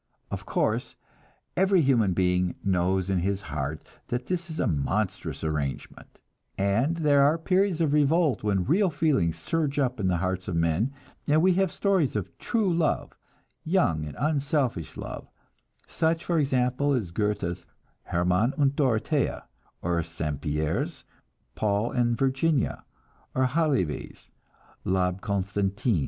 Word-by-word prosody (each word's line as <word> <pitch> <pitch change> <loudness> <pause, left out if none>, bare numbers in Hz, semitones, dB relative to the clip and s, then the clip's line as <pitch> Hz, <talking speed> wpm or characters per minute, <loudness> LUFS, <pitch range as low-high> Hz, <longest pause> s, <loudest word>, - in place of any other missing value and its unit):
Of - - -5
course, - - 0 0.6
every 190 0 +4
human 115 -8 +3
being 90 0 +1
knows 95 0 +1
in 95 -2 +1
his 95 +2 0
heart 75 -2 -4 0.2
that 120 +1 -3
this 175 +1 -3
is 160 - -5
a - - +2
monstrous 90 +8 -1
arrangement, 75 -3 -4 0.4
and 115 +12 +1
there 145 -3 +4
are 150 +4 +4
periods 185 +1 +1
of 150 -3 +2
revolt 150 -2 +3
when 100 -3 +1
real 185 +7 +3
feeling 145 - +2
surges 140 - -1
up 130 -3 0
in 95 - 0
the 90 -1 +2
hearts 95 +1 -2
of 90 - -2
men, 85 +9 +1 0.4
and 155 +2 +4
we 185 0 +5
have 190 -1 +1
stories 190 - +1
of 105 -4 -3
true 215 -6 +1
love, 165 -2 0 0.5
young 155 - +1
and 75 -1 -7
unselfish 140 - -1
love, - - -7 0.6
such 165 +1 0
for 170 -2 +1
example 135 0 +1
as 110 -10 -1
Goethe's 90 -3 -2 0.4
"Hermann 90 +8 +1
and 140 -2 +2
Dorothea," 135 +1 0 0.4
or 85 -1 +1
St. 80 -3 -4
Pierre's 75 -1 -2 0.5
"Paul 105 +2 0
and 120 -2 +1
Virginia," 135 +4 +1 0.5
or 130 - +3
Halévy's 135 - -1 0.5
"L'Abbe 90 0 0
Constantin." 100 0 0
120 Hz, 140 wpm, -27 LUFS, 90-150 Hz, 0.6 s, we